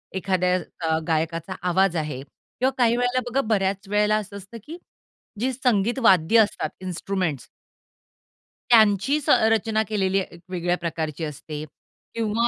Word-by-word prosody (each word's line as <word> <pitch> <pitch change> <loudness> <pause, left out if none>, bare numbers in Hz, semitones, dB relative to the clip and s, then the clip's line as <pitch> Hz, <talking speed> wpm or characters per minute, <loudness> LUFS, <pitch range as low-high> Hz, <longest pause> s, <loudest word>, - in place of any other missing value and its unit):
एखाद्या 185 -1 +1 0.3
अ, 160 - +2
गायकाचा 165 +2 -1
आवाज 190 0 +2
आहे 150 -4 -3
किंवा 255 - -4
काही 235 -1 +3
वेळेला 245 +1 +1
बघा, 265 +3 +1
बऱ्याच 200 -3 -1
वेळेला 210 +1 +2
असं 200 -1 -6
असतं 200 +4 -11
की 325 +6 -9 0.6
जी 255 +3 0
संगीत 240 -1 +1
वाद्य 195 -1 +5
असतात 205 -7 -1
इन्स्ट्रुमेंट्स 180 -6 -3 1.2
त्यांचीच 230 +6 +4
अ, 220 - +5
रचना 220 0 +1
केलेली 195 -2 +1
एक 175 -2 -7
वेगळ्या 175 -1 -1
प्रकारची 160 -2 -4
असते. 150 0 -6 0.5
किंवा 230 +1 +1
195 Hz, 135 wpm, -24 LUFS, 170-225 Hz, 1.2 s, वाद्य